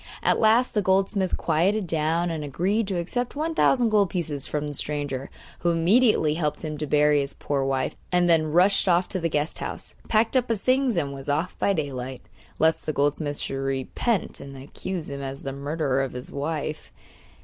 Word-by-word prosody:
At -, -, +3 dB
last 230 Hz, +3 st, +4 dB
the 210 Hz, -, +2 dB
goldsmith 190 Hz, 0 st, +1 dB
quieted 185 Hz, +6 st, +1 dB
down, 165 Hz, +1 st, 0 dB
and 160 Hz, -2 st, -3 dB
agreed 190 Hz, +9 st, 0 dB
to 190 Hz, -2 st, -2 dB
accept 245 Hz, +10 st, -2 dB
one 315 Hz, +3 st, -1 dB
thousand 250 Hz, -6 st, +3 dB
gold 205 Hz, -3 st, +3 dB
pieces 155 Hz, -6 st, -2 dB
from 150 Hz, 0 st, -2 dB
the 145 Hz, -, -4 dB
stranger, 145 Hz, -2 st, -2 dB, 0.3 s
who 175 Hz, -, +1 dB
immediately 170 Hz, 0 st, +3 dB
helped 155 Hz, -1 st, -2 dB
him 155 Hz, -1 st, -3 dB
to 150 Hz, -, -3 dB
bury 150 Hz, 0 st, +4 dB
his 140 Hz, 0 st, -5 dB
poor 140 Hz, -2 st, -1 dB
wife, 135 Hz, -1 st, -1 dB, 0.2 s
and 180 Hz, -1 st, +3 dB
then 160 Hz, -2 st, +3 dB
rushed 185 Hz, +5 st, +4 dB
off 175 Hz, +1 st, +3 dB
to 185 Hz, -, -2 dB
the 165 Hz, -1 st, -1 dB
guest 150 Hz, 0 st, -1 dB
house, -, -, -6 dB, 0.2 s
packed 225 Hz, +3 st, +2 dB
up 250 Hz, -2 st, +2 dB
his 220 Hz, -4 st, -1 dB
things 255 Hz, -4 st, +2 dB
and 140 Hz, -4 st, -1 dB
was 135 Hz, 0 st, -7 dB
off 155 Hz, +5 st, -1 dB
by 200 Hz, -, +2 dB
daylight, 130 Hz, -6 st, -4 dB, 0.3 s
lest 160 Hz, 0 st, +2 dB
the 155 Hz, -, 0 dB
goldsmith 145 Hz, +1 st, 0 dB
should 135 Hz, -, -3 dB
repent 135 Hz, -, -1 dB
and 140 Hz, -1 st, -9 dB
accuse 160 Hz, +5 st, -6 dB
him 140 Hz, 0 st, -6 dB
as 135 Hz, 0 st, -6 dB
the 135 Hz, -, -4 dB
murderer 140 Hz, -1 st, -1 dB
of 135 Hz, -, -3 dB
his 125 Hz, 0 st, -7 dB
wife. 155 Hz, +1 st, -4 dB
160 Hz, 195 wpm, -25 LUFS, 145-195 Hz, 0.3 s, last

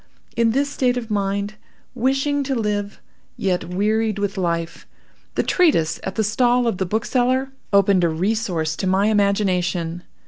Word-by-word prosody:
In 230 Hz, -1 st, +3 dB
this 275 Hz, +5 st, +1 dB
state 255 Hz, -3 st, 0 dB
of 230 Hz, -3 st, -5 dB
mind, 200 Hz, +1 st, -1 dB, 0.4 s
wishing 270 Hz, +3 st, 0 dB
to 270 Hz, 0 st, -1 dB
live, 205 Hz, -3 st, -2 dB, 0.4 s
yet 180 Hz, -3 st, -1 dB
wearied 210 Hz, +4 st, 0 dB
with 200 Hz, 0 st, -2 dB
life, 170 Hz, -3 st, -3 dB, 0.5 s
the -, -, +1 dB
treatise 300 Hz, -, +2 dB
at 190 Hz, -, -5 dB
the 220 Hz, -, +1 dB
stall 245 Hz, +3 st, +2 dB
of 225 Hz, -6 st, -1 dB
the 190 Hz, -, -1 dB
bookseller 255 Hz, +6 st, 0 dB, 0.2 s
opened 200 Hz, -2 st, +4 dB
a 170 Hz, -, +3 dB
resource 175 Hz, -2 st, -1 dB
to 190 Hz, -, -2 dB
my 195 Hz, +3 st, +3 dB
imagination. 185 Hz, -5 st, 0 dB
205 Hz, 150 wpm, -21 LUFS, 185-240 Hz, 0.5 s, opened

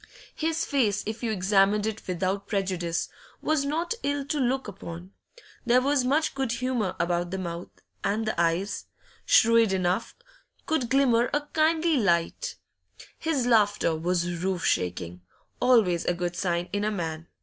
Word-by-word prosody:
His 325 Hz, 0 st, -1 dB
face, 220 Hz, -8 st, +1 dB
if 220 Hz, +1 st, -5 dB
you 235 Hz, -, -1 dB
examined 200 Hz, +1 st, +3 dB
it 220 Hz, -1 st, -4 dB
without 190 Hz, +2 st, -2 dB
prejudice, 185 Hz, -4 st, -1 dB, 0.3 s
was 310 Hz, -3 st, 0 dB
not 330 Hz, +7 st, -1 dB
ill 285 Hz, -1 st, -1 dB
to 300 Hz, +1 st, -2 dB
look 260 Hz, 0 st, 0 dB
upon; 180 Hz, -2 st, -8 dB, 0.5 s
there 245 Hz, 0 st, +4 dB
was 275 Hz, 0 st, +2 dB
much 290 Hz, +5 st, +1 dB
good 265 Hz, -3 st, -1 dB
humour 240 Hz, -5 st, -1 dB
about 175 Hz, 0 st, 0 dB
the 190 Hz, -, -3 dB
mouth, 170 Hz, -1 st, -5 dB, 0.3 s
and 215 Hz, +3 st, 0 dB
the 215 Hz, -6 st, 0 dB
eyes, 170 Hz, +4 st, 0 dB, 0.4 s
shrewd 230 Hz, -2 st, +5 dB
enough, 185 Hz, +3 st, 0 dB, 0.5 s
could 275 Hz, -7 st, 0 dB
glimmer 250 Hz, -3 st, +3 dB
a 295 Hz, -, +1 dB
kindly 320 Hz, 0 st, +3 dB
light 200 Hz, -, 0 dB, 0.6 s
His 310 Hz, -6 st, 0 dB
laughter 205 Hz, -8 st, +3 dB
was 175 Hz, +1 st, -1 dB
roof 190 Hz, -2 st, -1 dB
shaking 90 Hz, 0 st, -1 dB, 0.4 s
always 220 Hz, -9 st, +4 dB
a 175 Hz, -, +1 dB
good 175 Hz, 0 st, -3 dB
sign 175 Hz, -2 st, -1 dB
in 205 Hz, 0 st, 0 dB
a 215 Hz, -, +1 dB
man. 165 Hz, -5 st, -4 dB
205 Hz, 150 wpm, -27 LUFS, 175-260 Hz, 0.6 s, shrewd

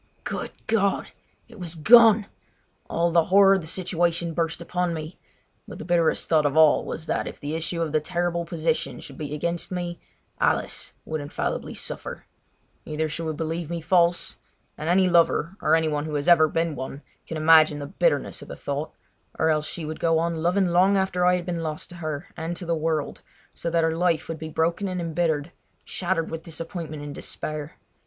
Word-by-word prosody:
Good -, -, -4 dB, 0.2 s
God! 200 Hz, -3 st, +1 dB, 0.4 s
It -, -, -14 dB
was 175 Hz, -2 st, -3 dB
gone! 220 Hz, +4 st, +7 dB, 0.6 s
All 170 Hz, +1 st, +1 dB
the 165 Hz, -1 st, +4 dB
horror 195 Hz, +1 st, +6 dB
of 190 Hz, -, +1 dB
the 160 Hz, -, -8 dB
situation 170 Hz, -1 st, 0 dB
burst 165 Hz, 0 st, -1 dB
upon 175 Hz, 0 st, -1 dB
me; 155 Hz, +2 st, -7 dB, 0.5 s
but -, -, -9 dB
the -, -, -8 dB
bitterest 170 Hz, -2 st, +2 dB
thought 155 Hz, -3 st, +3 dB
of 145 Hz, +2 st, -2 dB
all 155 Hz, -2 st, +6 dB
was 160 Hz, -, -6 dB
that -, -, -1 dB
if -, -, -8 dB
the 145 Hz, +2 st, -4 dB
issue 165 Hz, +1 st, -2 dB
of 160 Hz, -, -3 dB
the 155 Hz, -, +3 dB
terrible 170 Hz, +2 st, -1 dB
position 165 Hz, -1 st, -2 dB
should 140 Hz, -, -10 dB
be 150 Hz, -1 st, -4 dB
against 170 Hz, +4 st, -2 dB
me 175 Hz, -1 st, -4 dB, 0.4 s
Alice -, -, 0 dB
would 155 Hz, -1 st, -3 dB
infallibly 145 Hz, -, -3 dB
suffer. -, -, -6 dB, 0.6 s
Either 155 Hz, +1 st, -2 dB
she 155 Hz, +2 st, -5 dB
would 160 Hz, -2 st, -3 dB
believe 165 Hz, 0 st, -3 dB
me 170 Hz, 0 st, -3 dB
false—and 170 Hz, -2 st, -1 dB
any 185 Hz, +1 st, +4 dB
lover, 170 Hz, 0 st, +3 dB
or 155 Hz, -, +4 dB
any 160 Hz, -1 st, +2 dB
one 150 Hz, -1 st, -1 dB
who 155 Hz, -1 st, -4 dB
has 145 Hz, -1 st, -2 dB
ever 170 Hz, -3 st, +7 dB
been 165 Hz, +1 st, -1 dB
one, 130 Hz, +2 st, -6 dB, 0.2 s
can 160 Hz, -, -4 dB
imagine 155 Hz, -1 st, +6 dB
the 145 Hz, -, -5 dB
bitterness -, -, 0 dB
of -, -, -10 dB
the -, -, -7 dB
thought—or 150 Hz, +2 st, -4 dB
else 155 Hz, 0 st, 0 dB
she 165 Hz, -, -6 dB
would 155 Hz, +1 st, -5 dB
go 165 Hz, -1 st, +2 dB
on 165 Hz, 0 st, 0 dB
loving 180 Hz, +4 st, +2 dB
long 185 Hz, +3 st, +4 dB
after 190 Hz, -2 st, 0 dB
I 180 Hz, 0 st, +5 dB
had 175 Hz, -1 st, -3 dB
been 175 Hz, -2 st, -3 dB
lost 155 Hz, -1 st, -4 dB
to 175 Hz, -, -10 dB
her 155 Hz, -2 st, -4 dB
and 165 Hz, +2 st, -4 dB
to 180 Hz, -, -5 dB
the 170 Hz, -, 0 dB
world, 155 Hz, -2 st, -1 dB, 0.3 s
so 170 Hz, -, -4 dB
that 165 Hz, 0 st, +2 dB
her 160 Hz, 0 st, +1 dB
life 170 Hz, -2 st, +1 dB
would 165 Hz, -1 st, -5 dB
be 160 Hz, -1 st, -6 dB
broken 170 Hz, +5 st, 0 dB
and 185 Hz, -1 st, -3 dB
embittered, 165 Hz, -2 st, -1 dB, 0.3 s
shattered 175 Hz, -3 st, -2 dB
with 165 Hz, 0 st, -4 dB
disappointment 165 Hz, -2 st, -6 dB
and 145 Hz, -1 st, -6 dB
despair. 155 Hz, +1 st, -5 dB
165 Hz, 195 wpm, -25 LUFS, 155-175 Hz, 0.6 s, gone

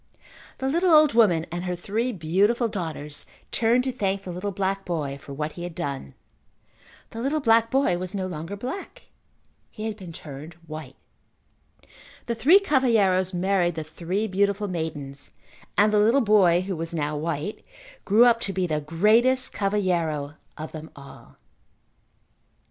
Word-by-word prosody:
The 265 Hz, -, -2 dB
little 340 Hz, +6 st, +2 dB
old 305 Hz, -4 st, +6 dB
woman 185 Hz, -9 st, +4 dB
and 175 Hz, +1 st, -4 dB
her 180 Hz, -1 st, -2 dB
three 215 Hz, +8 st, -2 dB
beautiful 205 Hz, +6 st, +1 dB
daughters 160 Hz, -7 st, -5 dB, 0.2 s
turned 235 Hz, +2 st, +2 dB
to 260 Hz, -, -1 dB
thank 200 Hz, -5 st, -2 dB
the 185 Hz, -, -6 dB
little 180 Hz, +4 st, -3 dB
black 195 Hz, 0 st, -2 dB
boy 150 Hz, -6 st, -3 dB
for -, -, -11 dB
what 150 Hz, +2 st, -3 dB
he 175 Hz, -, -10 dB
had 175 Hz, -1 st, -6 dB
done. 140 Hz, -, -5 dB, 1.0 s
The 230 Hz, -, -6 dB
little 280 Hz, +5 st, 0 dB
black 230 Hz, -4 st, +4 dB
boy 265 Hz, -10 st, +2 dB
was 185 Hz, +2 st, -5 dB
no 190 Hz, -1 st, -2 dB
longer 175 Hz, +1 st, -5 dB
black. 320 Hz, -, -7 dB, 0.6 s
He 215 Hz, -, -7 dB
had 220 Hz, -1 st, -3 dB
been 185 Hz, -5 st, -9 dB
turned 155 Hz, +1 st, -9 dB
white. 155 Hz, -4 st, -8 dB, 1.3 s
The 235 Hz, -, -1 dB
three 270 Hz, -, +6 dB
cavalheiros 225 Hz, -, +2 dB
married 180 Hz, -2 st, +1 dB
the 160 Hz, -, -3 dB
three 175 Hz, +6 st, -3 dB
beautiful 200 Hz, +1 st, 0 dB
maidens 150 Hz, -6 st, -5 dB, 0.5 s
and 210 Hz, +1 st, +4 dB
the 210 Hz, -, +4 dB
little 230 Hz, +7 st, +4 dB
boy 195 Hz, -6 st, +4 dB
who 190 Hz, 0 st, -3 dB
was 165 Hz, +1 st, -4 dB
now 150 Hz, -1 st, -1 dB
white, 160 Hz, +5 st, -3 dB, 0.4 s
grew 220 Hz, +5 st, +5 dB
up 235 Hz, -1 st, +4 dB
to 195 Hz, -, -2 dB
be 185 Hz, 0 st, 0 dB
the 155 Hz, -3 st, -1 dB
greatest 220 Hz, -, +3 dB
cavalheiro 175 Hz, -8 st, 0 dB, 0.2 s
of 155 Hz, +1 st, -6 dB
them 155 Hz, 0 st, -8 dB
all. 140 Hz, -1 st, -14 dB
190 Hz, 160 wpm, -25 LUFS, 160-225 Hz, 1.3 s, old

